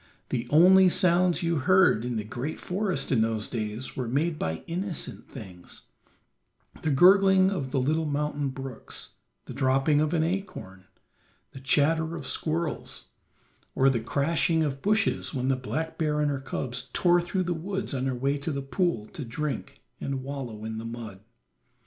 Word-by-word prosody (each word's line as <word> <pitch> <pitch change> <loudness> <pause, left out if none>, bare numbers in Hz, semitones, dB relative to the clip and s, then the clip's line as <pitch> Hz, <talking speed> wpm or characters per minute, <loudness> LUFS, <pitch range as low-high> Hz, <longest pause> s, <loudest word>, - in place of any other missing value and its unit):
The 120 -1 -2
only 185 +4 +7
sounds 180 -1 +3
you 170 -1 +1
heard 175 - +4
in 125 -1 -3
the 110 - -2
great 125 +8 -5
forest 180 -7 -2
in 120 -5 +3
those 110 -1 0
days 110 +1 -4
were 125 -2 -3
made 150 +6 0
by 80 0 -3
innocent 180 +1 -4
things: 90 -4 -11 1.0
the 160 - -1
gurgling 190 +5 +6
of 145 -9 -3
the 135 - 0
little 155 +5 0
mountain 145 -1 -1
brooks, 135 -1 -8 0.3
the - - -8
dropping 135 +3 +2
of 155 +2 0
an 160 - +2
acorn, 160 - -4 0.7
the 135 - -10
chatter 160 +4 +2
of - - -7
squirrels, 160 0 -3 0.7
or 135 0 +4
the 120 - 0
crashing 160 +7 +1
of 140 -2 -3
bushes 215 -6 0
when 130 0 -1
the 135 - +3
black 155 +5 -4
bear 150 -2 +1
and 150 -1 +1
her 135 -1 -3
cubs 125 -1 -4
tore 175 -1 +4
through 185 +2 -1
the 175 0 -1
woods 190 +3 -4
on 130 0 -1
her 130 - -1
way 140 +3 0
to 145 +3 -3
the 140 -1 -3
pool 145 - -1
to 150 - -7
drink 135 +5 -5 0.2
and 135 -1 -3
wallow 130 -6 -6
in 110 0 -4
the - - -6
mud. 115 -4 -7
145 Hz, 170 wpm, -27 LUFS, 130-170 Hz, 1.0 s, only